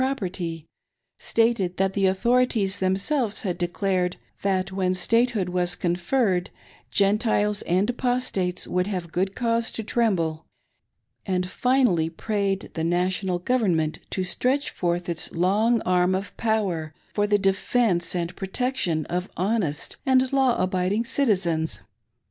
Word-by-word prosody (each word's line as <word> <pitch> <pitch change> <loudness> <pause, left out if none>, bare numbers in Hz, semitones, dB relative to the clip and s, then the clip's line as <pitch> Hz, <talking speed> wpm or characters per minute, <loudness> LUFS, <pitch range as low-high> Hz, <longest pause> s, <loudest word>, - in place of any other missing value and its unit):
6o7' 260 - +3
property; 175 - -4 0.5
stated 225 -6 +1
that 195 0 +1
the 195 -1 +2
authorities 220 0 +2
themselves 200 +5 +1
had 180 -3 -2
declared 180 0 -1 0.2
that 190 -1 0
when 185 -1 0
statehood 225 +1 +1
was 180 -1 +1
conferred, 180 +2 0 0.4
Gentiles 210 0 +2
and 185 +4 +1
Apostates 245 -7 -1
would 180 +1 0
have 180 -5 -4
good 190 +3 -1
cause 230 -1 0
to 225 - -5
tremble; 180 -9 0 0.8
and, 180 -2 -1
finally, 245 -8 +2
prayed 200 +2 -2
the 160 - -3
National 180 +2 0
Government 175 -7 0
to 185 - -1
stretch 260 +9 0
forth 175 0 -2
its 170 -1 -2
long 210 +7 +2
arm 180 0 +2
of 195 +2 -5
power 185 -9 -1 0.2
for 205 0 +1
the 205 0 +3
defence 195 -1 +1
and 175 0 -2
protection 190 - -1
of 180 +2 -3
honest 185 -6 -1
and 260 -1 +2
law 265 -3 +3
abiding 185 +4 0
citi 235 -3 +2
zens. 160 -1 -1
190 Hz, 130 wpm, -25 LUFS, 180-230 Hz, 0.8 s, 6o7